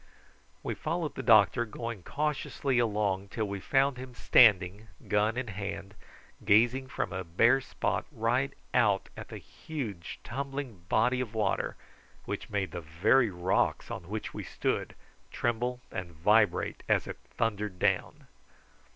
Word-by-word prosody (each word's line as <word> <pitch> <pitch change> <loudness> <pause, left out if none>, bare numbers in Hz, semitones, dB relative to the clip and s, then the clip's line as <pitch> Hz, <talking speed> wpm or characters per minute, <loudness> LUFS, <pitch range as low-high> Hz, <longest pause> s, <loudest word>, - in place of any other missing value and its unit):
We - - -2
followed 165 -3 -2
the - - -5
doctor, 110 -1 +5
going 115 -2 -6
cautiously 140 - -1
along 105 -4 0
till 110 +1 -3
we 100 0 -4
found 135 +5 +2
him 130 -1 -9
standing 105 -3 +5 0.2
gun 105 +3 +2
in 125 -2 -3
hand 100 -1 -5 0.5
gazing 120 +5 +4
from - - -3
a 95 0 -3
bare 115 +10 +3
spot 135 - -2
right 125 +2 0 0.2
out 105 -6 +3
at - - -8
the - - -8
huge 110 - -6
tumbling 135 -7 -5
body 125 +3 +3
of 115 -3 -5
water, 105 -3 0 0.5
which - - -5
made 100 -4 -1
the 85 - -5
very 100 +10 +3
rocks 90 0 0
on 85 - -6
which 110 +1 -4
we - - -5
stood - - -2 0.3
tremble 120 +1 -1
and 90 -2 -5
vibrate 105 +7 +2
as - - +3
it - - -7 0.2
thundered 105 -4 -1
down. - - 0
110 Hz, 140 wpm, -30 LUFS, 100-125 Hz, 0.5 s, doctor